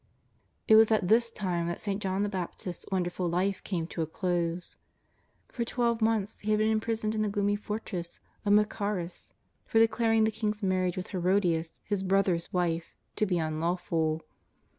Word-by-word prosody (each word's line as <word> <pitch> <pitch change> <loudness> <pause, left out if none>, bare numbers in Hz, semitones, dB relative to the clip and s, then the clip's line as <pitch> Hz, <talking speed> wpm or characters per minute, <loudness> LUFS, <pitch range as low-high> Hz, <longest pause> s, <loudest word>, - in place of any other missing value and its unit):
It - - +6
was 220 0 +6
at 210 -5 +2
this 230 +2 +5
time 180 -6 -2
that 170 - -3
St. 200 -1 -3
John 190 0 0
the - - +1
Baptist's 180 -2 -5
won* 190 -2 +2
derful 175 0 -2
life 185 +3 0
came 175 -4 -2
to 165 - -5
a 160 - -1
close. 175 0 -2 0.7
For 235 - -2
tw^elve 235 -1 0
months 220 -2 +1
he 210 - -5
had 215 - +4
been 215 +1 +2
imprisoned 220 0 0
in 215 - -1
the 210 - +1
gloomy 205 0 +1
fortress 205 -4 -5 0.2
of 205 - +3
Machaerus 205 -4 0 0.3
for - - 0
declaring 225 0 +4
the 220 - +2
king's 215 -1 -2
marriage 185 -1 +1
wdth 185 -1 -5
Herodias, 180 -3 0
his 205 -2 -1
brother's 190 -3 +1
wife, 170 -2 -1 0.2
to 215 - +2
be 185 - +1
imlawful. 160 0 -1
195 Hz, 175 wpm, -29 LUFS, 175-215 Hz, 0.7 s, It